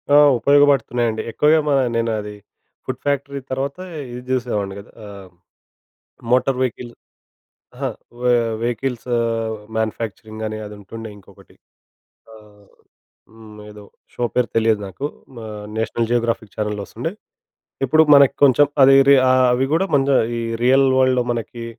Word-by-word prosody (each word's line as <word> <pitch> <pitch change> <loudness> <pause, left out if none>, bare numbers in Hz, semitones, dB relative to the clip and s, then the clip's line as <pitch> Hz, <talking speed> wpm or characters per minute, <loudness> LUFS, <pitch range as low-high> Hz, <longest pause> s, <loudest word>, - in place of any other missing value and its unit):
ఆ! - - +8 0.2
ఉపయోగపడుతున్నాయండి. 125 -5 +2
ఎక్కువగా 150 +5 +3
మ - - +1 0.3
నేను 115 0 0
అది 105 0 -7 0.5
ఫుడ్ 130 - -5
ఫ్యాక్టరీ 140 0 -2
తర్వాత, 135 +4 -3 0.3
ఇది 125 0 -7
జూసేవాడిని 115 -6 -2
గదా! 100 - -14
ఆహ్, 100 -2 -11 1.0
మోటార్ 125 +1 +2
వెహికల్‌ 120 -1 -4 0.8
అహా, - - -3 0.3
వె 125 0 +2 0.3
వెహికల్స్ 120 +1 -3
ఆహ్, 115 -1 -2 0.2
మ్యాన్యుఫ్యాక్చరింగ్, 110 0 -4
అని 110 0 -5
అది 105 - -9
ఉంటుండే 110 +3 -9
ఇంకొకటి. 100 - -20 0.8
ఆహ్, 105 -2 -19 0.6
హ్మ్. 110 -1 -14
ఏదో 105 0 -13 0.3
షో 120 - -2
పేరు 125 -1 +1
తెలియదు 110 -2 +2
నాకు. 95 +10 -5 0.3
మా 115 - -8 0.3
నేషనల్ 115 +1 -1
జియోగ్రాఫిక్ 115 -3 -1
ఛానెల్‌లో 105 -1 -3
వొస్తుం‌డే. - - -5 0.7
ఇప్పుడు 155 +5 +4
మనకి 140 -2 +5
కొంచెం 140 +2 +5 0.2
అది‌ 135 +1 +7
రీ 140 - +8
అవి 130 0 +3
కూడా 185 +4 +1
కొంచెం, 135 -1 +3 0.2
ఈ - - -3 0.2
రియల్ 135 +2 +4
వరల్డ్‌లో 130 -1 +2
మనకి 115 0 -6
120 Hz, 130 wpm, -20 LUFS, 110-130 Hz, 1.0 s, ఆ